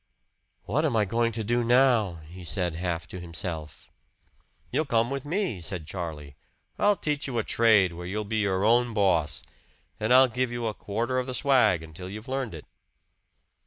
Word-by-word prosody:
"What -, -, 0 dB
am -, -, +1 dB
I 105 Hz, -2 st, +3 dB
going 115 Hz, +3 st, +1 dB
to 110 Hz, 0 st, -3 dB
do 120 Hz, +3 st, +1 dB
now?" 120 Hz, -6 st, +4 dB
he 90 Hz, +3 st, -11 dB
said 90 Hz, 0 st, -1 dB
half 85 Hz, 0 st, -3 dB
to 90 Hz, -, -7 dB
himself. 80 Hz, -3 st, -6 dB, 0.8 s
"You 155 Hz, -, +1 dB
come 120 Hz, -3 st, +1 dB
with 140 Hz, 0 st, -3 dB
me," 170 Hz, -, -1 dB
said 85 Hz, 0 st, -3 dB
Charlie. 75 Hz, -5 st, -6 dB, 0.4 s
"I'll 205 Hz, 0 st, +4 dB
teach 150 Hz, -6 st, -2 dB
you 125 Hz, -3 st, -3 dB
a 110 Hz, -, +1 dB
trade 105 Hz, -7 st, +4 dB
where 90 Hz, +1 st, -7 dB
you'll 105 Hz, +3 st, -2 dB
be 110 Hz, +2 st, -3 dB
your 100 Hz, -2 st, +1 dB
own 120 Hz, 0 st, +3 dB
boss. 90 Hz, -7 st, +1 dB, 0.6 s
And 110 Hz, +2 st, -1 dB
I'll 130 Hz, +1 st, +8 dB
give 125 Hz, +1 st, -1 dB
you 120 Hz, -1 st, -3 dB
a 110 Hz, -, -1 dB
quarter 115 Hz, +6 st, -2 dB
of 125 Hz, -, -3 dB
the 130 Hz, -, -3 dB
swag 125 Hz, -, +3 dB
until 80 Hz, +3 st, -9 dB
you've 105 Hz, +3 st, -8 dB
learned 130 Hz, -7 st, -3 dB
it." 75 Hz, -, -10 dB
110 Hz, 185 wpm, -27 LUFS, 90-125 Hz, 0.8 s, I'll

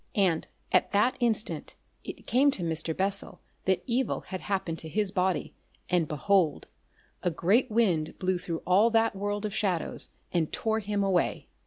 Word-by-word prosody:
And 185 Hz, -6 st, +2 dB, 0.2 s
at -, -, +3 dB
that 210 Hz, +6 st, +3 dB
instant 230 Hz, -3 st, 0 dB, 0.3 s
it -, -, -9 dB
came 270 Hz, +4 st, +4 dB
to 195 Hz, -10 st, -2 dB
Mr. 160 Hz, -1 st, -1 dB
Bessel 195 Hz, +1 st, -1 dB, 0.3 s
that 190 Hz, -1 st, +1 dB
evil 255 Hz, +2 st, 0 dB
had 185 Hz, -1 st, -7 dB
happened 190 Hz, -5 st, -2 dB
to 160 Hz, -, -5 dB
his 205 Hz, +3 st, +1 dB
body, 185 Hz, -2 st, 0 dB, 0.4 s
and 175 Hz, -3 st, +2 dB
behold! 165 Hz, +2 st, +1 dB, 0.6 s
a 180 Hz, -, +1 dB
great 195 Hz, +10 st, +2 dB
wind 185 Hz, -9 st, +1 dB
blew 185 Hz, -1 st, 0 dB
through 165 Hz, -2 st, -5 dB
all 195 Hz, +6 st, +4 dB
that 225 Hz, -2 st, +2 dB
world 205 Hz, +1 st, -2 dB
of 210 Hz, -, -3 dB
shadows 190 Hz, -6 st, +2 dB, 0.2 s
and 165 Hz, -3 st, 0 dB
tore 220 Hz, 0 st, 0 dB
him 205 Hz, -1 st, -1 dB
away. 190 Hz, -3 st, 0 dB
195 Hz, 165 wpm, -28 LUFS, 175-215 Hz, 0.6 s, came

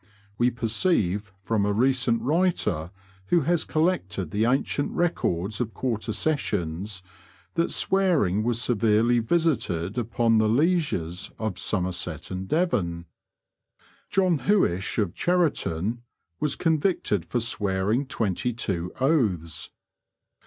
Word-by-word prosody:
We 120 Hz, +1 st, +4 dB
perceive 110 Hz, -, 0 dB
from 110 Hz, -2 st, +1 dB
a 105 Hz, -, +1 dB
recent 120 Hz, +1 st, +2 dB
writer, 140 Hz, -, +1 dB, 0.4 s
who 175 Hz, -, +3 dB
has 165 Hz, +3 st, +1 dB
collected 155 Hz, -, -1 dB
the 105 Hz, +3 st, +1 dB
ancient 135 Hz, +3 st, 0 dB
records 105 Hz, -, 0 dB
of 115 Hz, -2 st, -3 dB
quarter 115 Hz, -3 st, -2 dB
sessions, 100 Hz, -, -2 dB, 0.5 s
that 170 Hz, 0 st, +1 dB
swearing 170 Hz, -, +2 dB
was 115 Hz, +1 st, 0 dB
severely 115 Hz, 0 st, +3 dB
visited 115 Hz, -, 0 dB
upon 115 Hz, -1 st, +2 dB
the 110 Hz, 0 st, +3 dB
lieges 125 Hz, -, 0 dB
of 110 Hz, -5 st, -3 dB
Somerset 95 Hz, -2 st, -2 dB
and 95 Hz, 0 st, -4 dB
Devon. 90 Hz, -, 0 dB, 1.0 s
John 185 Hz, -5 st, +2 dB
Huishe, 100 Hz, -, +1 dB
of 100 Hz, -6 st, 0 dB
Cheriton, 120 Hz, -, 0 dB, 0.4 s
was 150 Hz, -2 st, 0 dB
convicted 160 Hz, -, +1 dB
for 120 Hz, -, -2 dB
swearing 105 Hz, +3 st, 0 dB
twenty 115 Hz, -1 st, -1 dB
two 90 Hz, -6 st, -3 dB
oaths. 100 Hz, -, 0 dB
115 Hz, 110 wpm, -26 LUFS, 95-150 Hz, 1.0 s, We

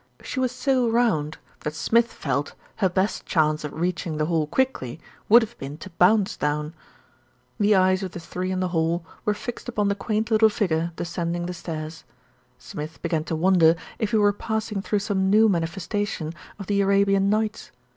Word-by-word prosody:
She 260 Hz, -, -4 dB
was 255 Hz, -2 st, +1 dB
so 255 Hz, -2 st, +1 dB
round 215 Hz, -11 st, +1 dB, 0.2 s
that 150 Hz, 0 st, -4 dB
Smith 230 Hz, +8 st, +2 dB
felt 140 Hz, 0 st, -2 dB, 0.2 s
her 190 Hz, -3 st, +2 dB
best 190 Hz, +3 st, 0 dB
chance 155 Hz, -2 st, +1 dB
of 150 Hz, -, -4 dB
reaching 175 Hz, -2 st, -2 dB
the 155 Hz, -, +1 dB
hall 160 Hz, -2 st, 0 dB
quickly 165 Hz, -, -1 dB, 0.3 s
would 235 Hz, +2 st, +8 dB
have 230 Hz, +2 st, -7 dB
been 140 Hz, +2 st, -6 dB
to 185 Hz, +4 st, -10 dB
bounce 190 Hz, +4 st, +3 dB
down. 150 Hz, +1 st, -2 dB, 0.9 s
The 205 Hz, 0 st, +4 dB
eyes 185 Hz, 0 st, +3 dB
of 185 Hz, -2 st, -5 dB
the -, -, -6 dB
three 180 Hz, +2 st, -4 dB
in 185 Hz, 0 st, -1 dB
the 185 Hz, -, 0 dB
hall 165 Hz, 0 st, 0 dB, 0.2 s
were 210 Hz, -, +1 dB
fixed 240 Hz, +3 st, -6 dB
upon 210 Hz, -4 st, 0 dB
the -, -, +2 dB
quaint 215 Hz, +2 st, -2 dB
little 220 Hz, 0 st, +6 dB
figure 170 Hz, -5 st, 0 dB
descending 170 Hz, 0 st, -3 dB
the 180 Hz, -, -4 dB
stairs. 160 Hz, -2 st, -6 dB, 0.5 s
Smith 155 Hz, +2 st, -8 dB
began 165 Hz, -2 st, -1 dB
to 165 Hz, -, -2 dB
wonder 165 Hz, -1 st, +5 dB, 0.2 s
if 220 Hz, -, 0 dB
he 220 Hz, -, +2 dB
were 205 Hz, -1 st, +4 dB
passing 220 Hz, -1 st, -3 dB
through 210 Hz, +1 st, 0 dB
some 190 Hz, -3 st, +1 dB
new 215 Hz, +2 st, +6 dB
manifestation 175 Hz, -1 st, -2 dB, 0.2 s
of 200 Hz, -, -7 dB
the 200 Hz, +1 st, +1 dB
Arabian 195 Hz, 0 st, +3 dB
Nights. 215 Hz, +1 st, -1 dB
185 Hz, 185 wpm, -24 LUFS, 165-210 Hz, 0.9 s, would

